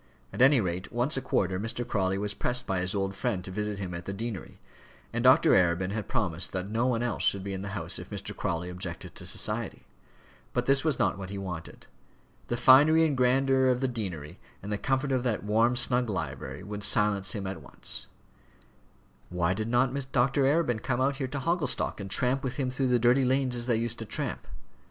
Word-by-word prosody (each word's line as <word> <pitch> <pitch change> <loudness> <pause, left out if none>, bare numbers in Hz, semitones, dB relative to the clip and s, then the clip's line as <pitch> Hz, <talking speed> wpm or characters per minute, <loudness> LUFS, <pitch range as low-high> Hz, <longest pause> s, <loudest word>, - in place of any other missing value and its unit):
At - - -3
any 135 +1 +7
rate 90 -2 -3
once 120 +5 0
a 135 - 0
quarter 95 -7 0
Mr. 115 +3 -3
Crawley 95 -1 0
was 105 +1 -2
pressed 125 0 0
by 95 -1 -1
his 90 +2 -2
old 95 0 -1
friend 100 -3 -2
to 95 - -6
visit 105 +1 -3
him 95 -2 -5
at 85 0 -6
the 100 - -4
deanery, 110 -3 -6 0.5
and - - -1
Dr. - - +6
Arabin 90 +1 +3
had 105 -1 -4
promised 95 -8 -1
that 95 0 -2
no 115 +3 +1
one 120 -2 0
else 120 -2 -2
should 100 -1 +2
be 100 0 -4
in 95 - -4
the 100 - -5
house - - -3
if - - -9
Mr. - - -6
Crawley 85 +1 -2
objected 90 -2 -7
to - - -7
society. - - -1 0.7
But 125 - 0
this 135 0 +3
was 155 -5 +1
not - - +1
what 95 -1 -6
he 100 - -5
wanted. 90 -4 -7 0.6
The 120 - -1
finery 150 +6 +6
and 150 -3 +1
grandeur 130 +1 +3
of 125 -1 +2
the 135 - +1
deanery, 95 - -5 0.2
and 100 - -5
the 105 - -1
comfort 135 +1 0
of 130 -1 +1
that 120 -3 -1
warm, 115 +4 +2
snug 125 -1 +2
library, 70 -8 -4
would 105 0 -6
silence 100 -3 +2
him 100 -3 -4
at 95 -3 -5
once. 70 - -4 1.2
Why 90 0 0
did 110 +3 -3
not 125 +2 +2 0.2
Dr. 135 +2 +2
Arabin 135 -6 +2
come 120 +2 -1
out 135 +1 +1
there 135 - -1
to 140 +2 -4
Hogglestock, 165 -7 0
and 100 -1 -6
tramp 125 +6 +1
with 130 -2 -3
him 130 -3 -1
through 135 +1 0
the 125 -1 +3
dirty 120 +3 +4
lanes 130 0 +1
as 120 0 -4
they 120 - +3
used 115 0 -3
to 115 - -5
tramp? - - -4
115 Hz, 215 wpm, -28 LUFS, 95-130 Hz, 1.2 s, any